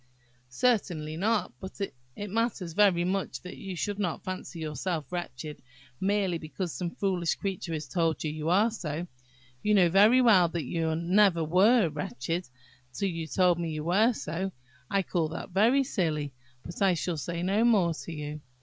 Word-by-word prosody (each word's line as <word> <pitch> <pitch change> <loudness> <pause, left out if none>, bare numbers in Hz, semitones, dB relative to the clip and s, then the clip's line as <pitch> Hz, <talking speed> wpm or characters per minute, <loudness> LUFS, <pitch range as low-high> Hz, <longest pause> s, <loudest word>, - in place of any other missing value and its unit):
"Certainly 165 - 0
not; 215 +4 0
but 190 +1 -9
it 140 +2 -6
matters 210 -6 -1
very 190 -3 +4
much 190 +2 -2
that 180 - -8
you 195 -2 -6
should 205 +4 -3
not 180 -5 -2
fancy 185 -2 -6
yourself 155 0 -3
wretched 155 -4 -5 0.4
merely 195 -3 +1
because 165 +2 -5
some 175 -2 -3
foolish 180 -5 0
creature 190 -4 -4
has 155 -2 -4
told 160 +2 0
you 155 - -1
you 155 +1 -3
are 205 +6 +4
so; 170 -6 -4 0.6
you 210 0 +3
know 180 -3 +5
very 210 +8 +6
well 210 -8 +6
that 170 -1 -3
you 160 +3 -1
never 175 +1 +3
were 190 +6 +4
wretched 150 +2 -4 0.4
till 195 +10 -1
you 165 -2 -4
were - - -10
told 180 -2 +3
you 160 -3 -3
were 200 +8 +4
so. 190 -3 -3 0.4
I 195 -1 +1
call 170 -3 0
that 160 +3 -7
very 230 +9 +4
silly; 155 - -1 0.3
but 170 - -9
I 190 -2 +4
shall 170 0 -2
say 170 +4 -3
no 200 +5 +2
more 200 -8 +4
to 165 - -8
you." 150 -1 -6
175 Hz, 175 wpm, -28 LUFS, 160-200 Hz, 0.6 s, very